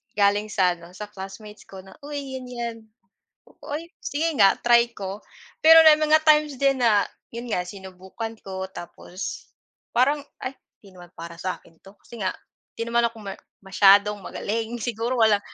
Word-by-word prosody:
galing 205 Hz, +1 st, +3 dB
sa 180 Hz, -4 st, +2 dB
ano, 170 Hz, +1 st, -14 dB
sa 210 Hz, +2 st, -7 dB
classmates 210 Hz, +2 st, -10 dB
ko 190 Hz, -1 st, -10 dB
na, 190 Hz, -, -15 dB
"Uy, 280 Hz, -3 st, -5 dB
'yan 255 Hz, -, -9 dB
'yan." 235 Hz, -2 st, -5 dB, 0.9 s
"Uy, 310 Hz, +4 st, -5 dB, 0.2 s
sige 315 Hz, +4 st, -1 dB
nga. 195 Hz, -1 st, +6 dB
Try 235 Hz, 0 st, +4 dB
ko." 195 Hz, +1 st, -6 dB, 0.4 s
Pero 325 Hz, +1 st, +10 dB
may 305 Hz, -, +9 dB
mga 310 Hz, 0 st, +4 dB
times 300 Hz, -2 st, +4 dB
din 275 Hz, -1 st, +2 dB
na 210 Hz, -3 st, +4 dB, 0.3 s
yun 240 Hz, +1 st, -6 dB
nga, 180 Hz, -5 st, 0 dB
sinubukan 190 Hz, +3 st, -8 dB
ko 190 Hz, -1 st, -5 dB
tapos 180 Hz, +1 st, -8 dB, 0.5 s
parang, 280 Hz, +5 st, +3 dB, 0.2 s
"Ay, 260 Hz, +1 st, -5 dB, 0.3 s
'di 195 Hz, -, -16 dB
naman 175 Hz, -1 st, -14 dB
para 170 Hz, 0 st, -8 dB
sa'kin 180 Hz, -3 st, -6 dB
'to." 195 Hz, +1 st, -16 dB
Kasi 235 Hz, -, -13 dB
nga 185 Hz, -1 st, 0 dB, 0.5 s
'di 230 Hz, -, -2 dB
naman 235 Hz, 0 st, +2 dB
ako 230 Hz, 0 st, -12 dB
ma 195 Hz, -1 st, -5 dB, 0.3 s
masyadong 200 Hz, +2 st, +5 dB
magaling. 225 Hz, +4 st, -4 dB
Siguro 235 Hz, +1 st, -2 dB
wala 220 Hz, -2 st, +5 dB
215 Hz, 165 wpm, -24 LUFS, 195-250 Hz, 0.9 s, Pero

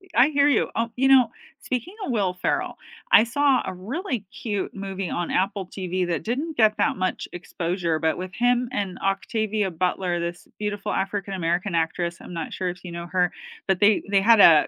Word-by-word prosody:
I 255 Hz, +5 st, +6 dB
hear 285 Hz, -1 st, +3 dB
you. 280 Hz, -, +3 dB
Oh, 230 Hz, 0 st, 0 dB
you 265 Hz, +2 st, +2 dB
know, 260 Hz, -3 st, +7 dB, 0.3 s
speaking 255 Hz, -, -3 dB
of 260 Hz, -, -2 dB
Will 195 Hz, -5 st, +1 dB
Ferrell, -, -, 0 dB, 0.4 s
I -, -, +8 dB
saw 275 Hz, +3 st, +2 dB
a 190 Hz, -, -4 dB
really 245 Hz, -, -4 dB, 0.2 s
cute 205 Hz, -4 st, -2 dB
movie 195 Hz, -2 st, -4 dB
on 175 Hz, -1 st, -2 dB
Apple 190 Hz, 0 st, 0 dB
TV 185 Hz, -1 st, -2 dB
that 170 Hz, -, -2 dB
didn't 285 Hz, +7 st, -3 dB
get 215 Hz, -2 st, +5 dB
that -, -, +1 dB
much 185 Hz, 0 st, -2 dB
exposure, 175 Hz, -1 st, -2 dB
but 160 Hz, -1 st, +1 dB
with 185 Hz, +1 st, -6 dB
him 245 Hz, 0 st, +2 dB
and 195 Hz, -4 st, -2 dB
Octavia 210 Hz, +1 st, 0 dB
Butler, 180 Hz, 0 st, -1 dB
this 170 Hz, +1 st, -5 dB
beautiful 205 Hz, -1 st, -3 dB
African 195 Hz, 0 st, -2 dB
American 175 Hz, +1 st, -1 dB
actress, 170 Hz, +1 st, -1 dB
I'm 180 Hz, -, -10 dB
not 165 Hz, -, -4 dB
sure 185 Hz, -1 st, -2 dB
if 180 Hz, +1 st, -8 dB
you 175 Hz, -, -7 dB
know 170 Hz, 0 st, -6 dB
her. 180 Hz, -1 st, +2 dB, 0.4 s
But 190 Hz, -2 st, +2 dB
they 205 Hz, 0 st, +5 dB
they 195 Hz, -1 st, +4 dB
had 225 Hz, +1 st, +6 dB
a 160 Hz, -6 st, +8 dB
195 Hz, 195 wpm, -24 LUFS, 180-230 Hz, 0.4 s, I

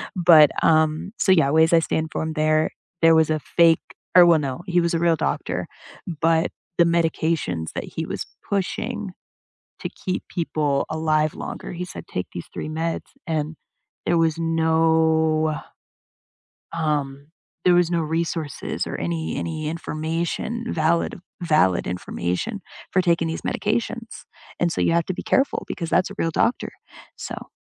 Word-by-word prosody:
But, 165 Hz, -5 st, +7 dB
um 155 Hz, +3 st, +2 dB
so 190 Hz, -, +3 dB
yeah, 160 Hz, -6 st, +4 dB
ways 160 Hz, +2 st, +4 dB
I 165 Hz, -, +7 dB
stay 160 Hz, -, -1 dB
informed 160 Hz, 0 st, -3 dB
there 155 Hz, 0 st, +2 dB, 0.3 s
there 165 Hz, 0 st, +7 dB
was 160 Hz, -1 st, +4 dB
a 155 Hz, -, +2 dB
fake 165 Hz, +1 st, +3 dB, 0.3 s
or 180 Hz, -1 st, +10 dB
well, 170 Hz, -2 st, +5 dB
no, 140 Hz, +2 st, -3 dB
he 180 Hz, 0 st, +2 dB
was 170 Hz, 0 st, 0 dB
a -, -, +1 dB
real 170 Hz, -1 st, +3 dB
doctor, -, -, -2 dB, 0.5 s
but 165 Hz, 0 st, +3 dB, 0.3 s
the 170 Hz, -, +6 dB
medications 160 Hz, -, 0 dB
that -, -, -2 dB
he -, -, -5 dB
was -, -, -4 dB, 0.2 s
pushing 200 Hz, 0 st, -2 dB, 0.7 s
to -, -, -4 dB
keep 185 Hz, -2 st, -4 dB
people 150 Hz, -4 st, 0 dB
alive 155 Hz, -1 st, +1 dB
longer, -, -, -6 dB
he 175 Hz, +1 st, -4 dB
said, -, -, -9 dB
"Take 90 Hz, -, -4 dB
these 85 Hz, -, -6 dB
3 155 Hz, -, -5 dB
meds," 165 Hz, +1 st, -2 dB, 0.2 s
and 155 Hz, -1 st, -2 dB, 0.5 s
there 170 Hz, -, +2 dB
was 165 Hz, -1 st, +2 dB
no, 160 Hz, -1 st, +2 dB, 1.2 s
um, 145 Hz, -3 st, -2 dB, 0.4 s
there 180 Hz, -, +6 dB
was 175 Hz, -1 st, +3 dB
no 170 Hz, -1 st, +1 dB
resources 160 Hz, -1 st, -2 dB
or -, -, -4 dB
any 80 Hz, -1 st, -2 dB
any 155 Hz, -2 st, -3 dB
information, 165 Hz, +9 st, -3 dB
valid 165 Hz, +2 st, +1 dB, 0.2 s
valid 155 Hz, -, +2 dB
information 90 Hz, -, -3 dB, 0.3 s
for 185 Hz, -, +3 dB
taking 170 Hz, -2 st, +2 dB
these 160 Hz, -, -4 dB
medications. 230 Hz, +2 st, -2 dB, 0.3 s
And 175 Hz, -1 st, +2 dB
so -, -, -3 dB
you -, -, +3 dB
have 170 Hz, -1 st, +2 dB
to 185 Hz, -, -1 dB
be -, -, -6 dB
careful 270 Hz, +1 st, +1 dB
because 170 Hz, -3 st, -4 dB
that's 180 Hz, -, +2 dB
a -, -, -9 dB
real 165 Hz, -, +1 dB
doctor, 235 Hz, -, 0 dB, 0.5 s
so -, -, -7 dB
160 Hz, 155 wpm, -23 LUFS, 155-170 Hz, 1.2 s, or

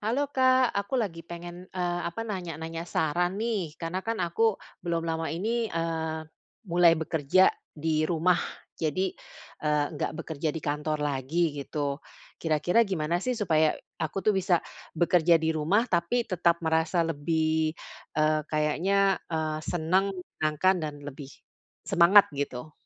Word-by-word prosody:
Halo, 260 Hz, +7 st, -1 dB
Kak, 260 Hz, -2 st, +4 dB
aku 200 Hz, +5 st, -2 dB
lagi 195 Hz, -9 st, -2 dB
pengen, 175 Hz, +2 st, -9 dB
eee, 175 Hz, -1 st, -2 dB
apa, 200 Hz, +7 st, -5 dB
nanya-nanya 165 Hz, -5 st, -5 dB
saran 175 Hz, +4 st, 0 dB
nih, 205 Hz, -8 st, -2 dB
karena 170 Hz, +2 st, -3 dB
kan 225 Hz, +3 st, -2 dB
aku 215 Hz, +5 st, +2 dB, 0.2 s
belum 170 Hz, -1 st, -2 dB
lama 165 Hz, 0 st, -2 dB
ini, 220 Hz, +9 st, -1 dB
eee, 160 Hz, -2 st, -2 dB, 0.5 s
mulai 170 Hz, -1 st, +6 dB
bekerja 160 Hz, +3 st, +3 dB, 0.2 s
di 155 Hz, 0 st, -1 dB
rumah, 175 Hz, +1 st, +2 dB, 0.4 s
jadi, 180 Hz, +4 st, 0 dB, 0.5 s
eee, 150 Hz, -1 st, +1 dB
nggak -, -, -2 dB
bekerja 160 Hz, 0 st, -3 dB
di -, -, -3 dB
kantor 150 Hz, 0 st, -1 dB
lagi, 145 Hz, +4 st, 0 dB
gitu. 140 Hz, 0 st, -3 dB, 0.4 s
Kira-kira 160 Hz, +6 st, +2 dB
gimana 170 Hz, -2 st, 0 dB
sih, 250 Hz, +5 st, -1 dB
supaya 160 Hz, -7 st, +2 dB, 0.2 s
aku 160 Hz, +5 st, -2 dB
tuh 215 Hz, -, +4 dB
bisa 190 Hz, -2 st, +2 dB, 0.4 s
bekerja 170 Hz, 0 st, +4 dB
di 160 Hz, 0 st, 0 dB
rumah, 170 Hz, +9 st, +2 dB
tapi 190 Hz, +3 st, +1 dB
tetap 170 Hz, -3 st, +1 dB
merasa 160 Hz, +2 st, +2 dB
lebih, 160 Hz, 0 st, 0 dB, 0.4 s
eee, 155 Hz, 0 st, +3 dB
kayaknya, 190 Hz, +6 st, +2 dB
eee, 155 Hz, -2 st, -1 dB
senang, 185 Hz, +5 st, 0 dB
menyenangkan 180 Hz, +1 st, 0 dB
dan 155 Hz, -2 st, -4 dB
lebih 140 Hz, -1 st, -8 dB, 0.6 s
semangat, 190 Hz, +4 st, +7 dB
gitu? 140 Hz, 0 st, -4 dB
165 Hz, 135 wpm, -28 LUFS, 155-185 Hz, 0.6 s, semangat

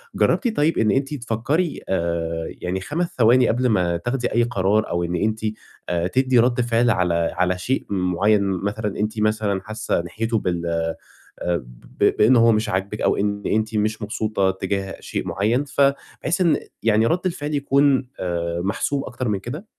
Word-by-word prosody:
جربتِ 240 Hz, -4 st, +1 dB
طيب 150 Hz, +2 st, +2 dB
إن 110 Hz, -2 st, +3 dB
أنتِ 135 Hz, +4 st, 0 dB
تفكّري 140 Hz, +6 st, -1 dB
آآ 85 Hz, -2 st, -1 dB, 0.2 s
يعني 90 Hz, +1 st, -2 dB
5 170 Hz, -, -3 dB
ثواني 120 Hz, +1 st, +5 dB
قبل 125 Hz, +2 st, +1 dB
ما 90 Hz, -5 st, +1 dB
تاخدي 120 Hz, +7 st, -2 dB
أي 120 Hz, -, +3 dB
قرار، 110 Hz, -2 st, +1 dB
أو 85 Hz, 0 st, -1 dB
إن 85 Hz, +1 st, -2 dB
أنتِ 110 Hz, +5 st, 0 dB, 0.5 s
آآ 85 Hz, 0 st, 0 dB
تدّي 130 Hz, +4 st, +2 dB
رَد 120 Hz, +1 st, +3 dB
فعل 120 Hz, 0 st, +2 dB
على 90 Hz, -5 st, +2 dB, 0.2 s
على 90 Hz, +1 st, +1 dB
شيء 130 Hz, +9 st, -2 dB
مُعيّن 95 Hz, +2 st, +2 dB
مثلًا، 100 Hz, +2 st, -2 dB
أنتِ 105 Hz, +1 st, -1 dB
مثلًا 105 Hz, -2 st, 0 dB
حاسّة 110 Hz, -2 st, -2 dB
ناحيته 110 Hz, +6 st, -2 dB
بال 85 Hz, -3 st, -2 dB
آآ 85 Hz, -1 st, -1 dB, 0.6 s
ب 65 Hz, -, -10 dB, 0.4 s
ب -, -, +4 dB
بإن 115 Hz, +5 st, +5 dB
هو 115 Hz, -1 st, +6 dB
مش 110 Hz, 0 st, +1 dB
عاجبِك 95 Hz, +3 st, -2 dB
أو -, -, +2 dB
إن 100 Hz, 0 st, -1 dB
أنتِ 110 Hz, +1 st, 0 dB
مش 110 Hz, +1 st, 0 dB
مبسوطة 105 Hz, -2 st, 0 dB
تِجاه 95 Hz, 0 st, -3 dB
شيء -, -, -4 dB
مُعيّن 115 Hz, +7 st, +1 dB
ف 140 Hz, 0 st, -2 dB, 0.4 s
بحيث 170 Hz, +4 st, -1 dB
إن 165 Hz, -5 st, +4 dB, 0.3 s
يعني 110 Hz, 0 st, +3 dB
رَد 170 Hz, +10 st, +2 dB
الفعل 155 Hz, -5 st, -2 dB
يكون 140 Hz, -2 st, +2 dB
آآ 85 Hz, -1 st, -2 dB
محسوب 135 Hz, +8 st, -1 dB
أكتر 125 Hz, +1 st, -4 dB
من 100 Hz, -2 st, 0 dB
كده؟ 145 Hz, -, -7 dB
110 Hz, 175 wpm, -22 LUFS, 95-125 Hz, 0.6 s, هو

